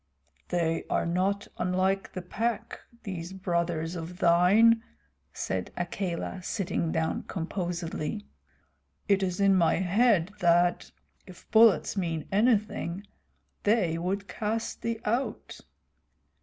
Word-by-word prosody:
"They 165 Hz, -2 st, 0 dB
are -, -, +1 dB
not 190 Hz, +4 st, 0 dB
unlike 185 Hz, +2 st, 0 dB
the 185 Hz, -, -5 dB
Pack, 225 Hz, +5 st, -3 dB, 0.2 s
these 180 Hz, -2 st, -6 dB
brothers 170 Hz, -3 st, -1 dB
of 170 Hz, +1 st, -6 dB
thine," 195 Hz, +7 st, +5 dB, 0.5 s
said 95 Hz, -1 st, -3 dB
Akela, 175 Hz, +1 st, -3 dB
sitting 175 Hz, -4 st, -2 dB
down 160 Hz, 0 st, -1 dB
composedly. 175 Hz, +1 st, -3 dB, 0.8 s
"It 200 Hz, -2 st, +3 dB
is 180 Hz, -1 st, -1 dB
in 195 Hz, -1 st, +5 dB
my 175 Hz, -3 st, +3 dB
head 195 Hz, 0 st, +2 dB
that, 175 Hz, -1 st, +3 dB, 0.4 s
if 185 Hz, -2 st, -14 dB
bullets 220 Hz, -2 st, +5 dB
mean 165 Hz, -5 st, -2 dB
anything, 205 Hz, -3 st, +1 dB, 0.6 s
they 195 Hz, -7 st, +2 dB
would 195 Hz, +3 st, -2 dB
cast 220 Hz, +3 st, -3 dB
thee 230 Hz, -1 st, -2 dB
out." 235 Hz, +5 st, -2 dB
185 Hz, 110 wpm, -28 LUFS, 170-205 Hz, 0.8 s, thine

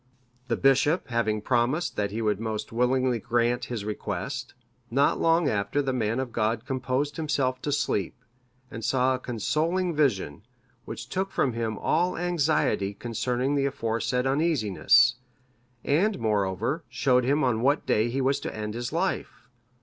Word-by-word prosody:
The 115 Hz, -, 0 dB
bishop 135 Hz, +5 st, +3 dB
having 110 Hz, -3 st, 0 dB
promised 130 Hz, +7 st, +1 dB
that 100 Hz, -1 st, -1 dB
he 110 Hz, +3 st, -3 dB
would 105 Hz, -2 st, +1 dB
most 110 Hz, -1 st, -4 dB
willingly 125 Hz, +1 st, +1 dB
grant 120 Hz, +2 st, 0 dB
his 115 Hz, -4 st, -5 dB
request, 125 Hz, +5 st, -4 dB, 0.3 s
not 140 Hz, +4 st, +2 dB
long 165 Hz, -1 st, +3 dB
after 100 Hz, +3 st, 0 dB
the 135 Hz, -2 st, 0 dB
man 115 Hz, -1 st, 0 dB
of 130 Hz, -2 st, -3 dB
God 110 Hz, 0 st, -1 dB
composed 130 Hz, +2 st, -2 dB
himself 140 Hz, -5 st, -1 dB
to 145 Hz, -, -2 dB
sleep, 105 Hz, -, -1 dB, 0.6 s
and 115 Hz, -, -7 dB
saw 130 Hz, +1 st, +2 dB
a 130 Hz, -, -2 dB
consoling 160 Hz, -, -1 dB
vision, 105 Hz, -, 0 dB, 0.4 s
which -, -, -7 dB
took 190 Hz, +1 st, -2 dB
from 130 Hz, -9 st, 0 dB
him 110 Hz, -2 st, -2 dB
all 175 Hz, -, +1 dB
anxiety 155 Hz, -, +1 dB
concerning 125 Hz, +4 st, -1 dB
the 140 Hz, -1 st, +2 dB
aforesaid 125 Hz, -1 st, -1 dB
uneasiness; 125 Hz, -, +3 dB, 0.7 s
and, 195 Hz, +9 st, +2 dB
moreover, 110 Hz, -, -1 dB
showed 125 Hz, -2 st, +2 dB
him 140 Hz, +5 st, +2 dB
on 120 Hz, -3 st, +1 dB
what 140 Hz, +4 st, +2 dB
day 110 Hz, +2 st, +2 dB
he 135 Hz, +3 st, -1 dB
was 135 Hz, +2 st, +1 dB
to -, -, -6 dB
end 105 Hz, 0 st, -4 dB
his 120 Hz, +1 st, -4 dB
life. 170 Hz, -8 st, -2 dB
125 Hz, 155 wpm, -26 LUFS, 115-145 Hz, 0.7 s, bishop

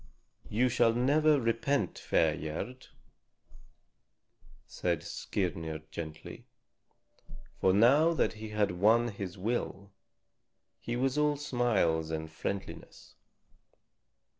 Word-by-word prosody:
"You 120 Hz, +4 st, +2 dB
shall 120 Hz, -2 st, +3 dB
never 145 Hz, +4 st, +3 dB
repent, 115 Hz, -, 0 dB
fair 80 Hz, -2 st, +2 dB
Gerd," 95 Hz, +12 st, -6 dB, 1.8 s
said -, -, -2 dB
Skirnir 80 Hz, -5 st, -3 dB
gently. 80 Hz, -1 st, -8 dB, 1.1 s
For 95 Hz, -, +4 dB
now 140 Hz, -, +5 dB
that -, -, +1 dB
he 110 Hz, 0 st, -8 dB
had 105 Hz, -2 st, 0 dB
won 110 Hz, +7 st, +3 dB
his 100 Hz, -3 st, -6 dB
will, 100 Hz, -1 st, -3 dB, 0.9 s
he 120 Hz, -, -4 dB
was 135 Hz, +3 st, 0 dB
all 150 Hz, -1 st, +2 dB
smiles 110 Hz, -, +1 dB
and 80 Hz, 0 st, -4 dB
friendliness. 95 Hz, +4 st, -6 dB
110 Hz, 95 wpm, -31 LUFS, 90-125 Hz, 1.8 s, now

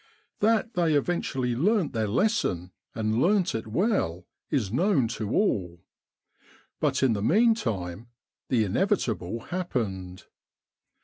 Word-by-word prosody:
That 225 Hz, +2 st, +2 dB
they 170 Hz, -5 st, +2 dB
eventually 135 Hz, -5 st, 0 dB
learnt 185 Hz, -, +1 dB
their 110 Hz, -2 st, 0 dB
lesson, 105 Hz, -, 0 dB, 0.2 s
and 110 Hz, +1 st, 0 dB
learnt 190 Hz, +2 st, +2 dB
it 110 Hz, 0 st, -4 dB
well, 110 Hz, -, 0 dB, 0.2 s
is 115 Hz, -9 st, -1 dB
known 160 Hz, -, +2 dB
to 110 Hz, -3 st, -4 dB
all. 90 Hz, -, 0 dB, 1.0 s
But -, -, +1 dB
in 130 Hz, -4 st, +4 dB
the 100 Hz, -, -2 dB
meantime 115 Hz, -, +1 dB, 0.4 s
the 120 Hz, -4 st, +3 dB
inevitable 115 Hz, -, -1 dB
happened. 105 Hz, -, -4 dB
125 Hz, 115 wpm, -27 LUFS, -, 1.0 s, in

